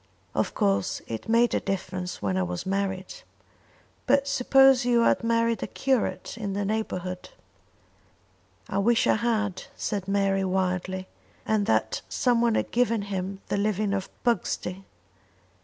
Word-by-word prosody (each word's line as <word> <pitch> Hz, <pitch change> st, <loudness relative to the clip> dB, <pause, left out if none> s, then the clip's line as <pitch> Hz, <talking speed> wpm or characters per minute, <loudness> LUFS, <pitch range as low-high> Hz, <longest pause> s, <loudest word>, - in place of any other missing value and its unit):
"Of -, -, -1 dB
course 100 Hz, -1 st, 0 dB
it 115 Hz, -, -6 dB
made 235 Hz, +1 st, +4 dB
a -, -, +2 dB
difference 185 Hz, -, -4 dB
when 95 Hz, -2 st, 0 dB
I 95 Hz, -, +1 dB
was 90 Hz, 0 st, -3 dB
married." 190 Hz, -1 st, -2 dB, 0.9 s
"But 275 Hz, +1 st, +3 dB
suppose 270 Hz, -1 st, +5 dB
you 240 Hz, -1 st, +3 dB
had 230 Hz, -, +3 dB
married 230 Hz, 0 st, +1 dB
a -, -, -2 dB
curate 260 Hz, -3 st, -1 dB
in 200 Hz, -3 st, -3 dB
the 200 Hz, +1 st, -1 dB
neighbourhood." 185 Hz, -4 st, -3 dB, 1.4 s
"I 200 Hz, -3 st, -1 dB
wish 230 Hz, +3 st, +3 dB
I -, -, +4 dB
had," 215 Hz, -4 st, -1 dB
said 200 Hz, -3 st, -3 dB
Mary 195 Hz, -1 st, +1 dB
wildly, 185 Hz, 0 st, -1 dB, 0.4 s
"and 215 Hz, -2 st, +1 dB
that -, -, +1 dB
someone 235 Hz, -2 st, +2 dB
had -, -, -1 dB
given 230 Hz, -3 st, +1 dB
him 195 Hz, -1 st, -4 dB
the -, -, 0 dB
living 205 Hz, 0 st, 0 dB
of 195 Hz, -1 st, -2 dB
Pugsty." 195 Hz, -4 st, -1 dB
200 Hz, 140 wpm, -26 LUFS, 185-230 Hz, 1.4 s, suppose